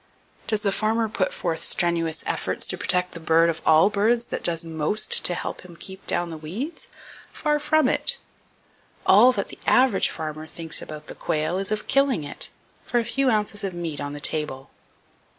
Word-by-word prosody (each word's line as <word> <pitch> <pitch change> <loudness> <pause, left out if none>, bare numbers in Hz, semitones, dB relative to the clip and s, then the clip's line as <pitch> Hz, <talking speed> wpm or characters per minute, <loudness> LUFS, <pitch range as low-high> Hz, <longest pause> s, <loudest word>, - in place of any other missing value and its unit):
Does 215 -2 0
the 200 - +2
farmer 220 +3 +1
put 215 - -1
forth 165 -2 -3
strenuous 165 -2 0
efforts - - -1
to - - 0
protect 180 -1 +1
the 170 - -8
bird 165 +1 +3
of 160 - -8
all 160 +6 +6
birds 230 +4 +2
that - - -3
does 165 -1 +2
most 160 +6 +1
to 175 - +4
help - - -5
him 180 -2 -13
keep 190 +3 -10
down 175 0 -1
the 160 -1 -7
weeds? 210 - -5 0.4
Far 300 -1 0
from 300 -1 +3
it! - - +3 0.9
All 220 +7 +7
that 200 -4 -3
the - - -11
average 250 -6 +4
farmer 155 0 -6
thinks 165 -1 -3
about 155 0 -8
the - - -8
quail 155 +4 -1
is 195 +1 +1
of 215 0 -1
killing 275 - +2
it, 145 - -2 0.3
for 245 - -1
a 230 - -2
few 270 +3 +1
ounces 210 -2 0
of 190 -3 -3
meat 165 -4 -4
on 145 0 -4
the 145 - -6
table. 150 -3 -2
180 Hz, 190 wpm, -24 LUFS, 160-215 Hz, 0.9 s, All